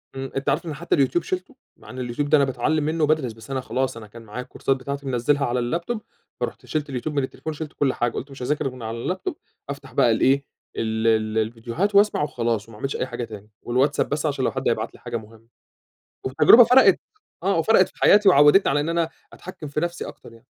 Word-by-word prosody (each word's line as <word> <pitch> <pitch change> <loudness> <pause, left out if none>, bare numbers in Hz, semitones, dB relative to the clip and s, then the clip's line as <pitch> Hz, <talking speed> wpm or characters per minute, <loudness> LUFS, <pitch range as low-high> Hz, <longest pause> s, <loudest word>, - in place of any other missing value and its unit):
إمم، 135 0 -5
أنت 135 - -1
عارف - - 0
إن 155 - -4
حتّى 170 +4 0
اليوتيوب 140 +5 +2
شِلته، 185 +1 -4 0.2
مع - - -16
إن 130 - -8
اليوتيوب 125 +4 -3
ده 155 - +6
أنا 140 - +4
باتعلّم 140 +4 0
منّه 155 +1 0
وبادرس 150 -6 +1
بس 115 +5 -12
أنا 130 -1 -1
خلاص 130 -1 -2
أنا 110 -2 -10
كان 115 +2 -13
معايا 115 +3 -7
الكورسات 130 +1 -1
بتاعتي 140 +2 -6
منزّلها 135 +3 +1
على 125 +1 0 0.2
الlaptop 235 +7 -4 0.4
فرُحت - - -4
شِلت 150 -2 -3
اليوتيوب 140 +3 -4
من 140 - +1
التليفون 160 +4 -5
وشِلت 155 0 -7
كل 135 -3 +1
حاجة، 120 -1 0
قلت 140 +2 -6
مش 135 - -11
هاذاكر 150 +2 -1
غير 130 - -3
من 125 - -11
على 115 +11 -3
الlaptop 185 - -4 0.4
أفتح 135 -3 -7
بقى 120 - +4
الإيه 135 +5 +3 0.3
ال 110 0 -1
ال 110 -1 +2
الفيديوهات 115 - -1
وأسمع 205 -6 +4
وخلاص، 115 -6 -2
وما 105 - -12
اعملش 135 +5 -3
أي - - -1
حاجة 120 - -5
تاني 105 -2 -9
والواتساب 130 +4 +1
بس 150 +2 -2
عشان 140 -3 0
لو - - +1
حد - - -3
هيبعت - - -2
لي - - -16
حاجة 120 -1 -4
مهمّة، 110 +1 -14 0.8
والتجربة 150 - +7
فرَقِت، 250 +3 +6 0.4
آه - - +1
وفرقت - - +4
في - - -21
حياتي، 205 0 +6
وعوّدتني 145 +2 +6
على 145 +1 +2
إن 155 - -2
أنا 165 -1 +1 0.2
أتحكِّم 175 -5 -9
في 145 +2 -2
نفسي 175 0 -3
أكتر - - -12
يعني. 115 - -18
135 Hz, 230 wpm, -23 LUFS, 120-155 Hz, 0.8 s, والتجربة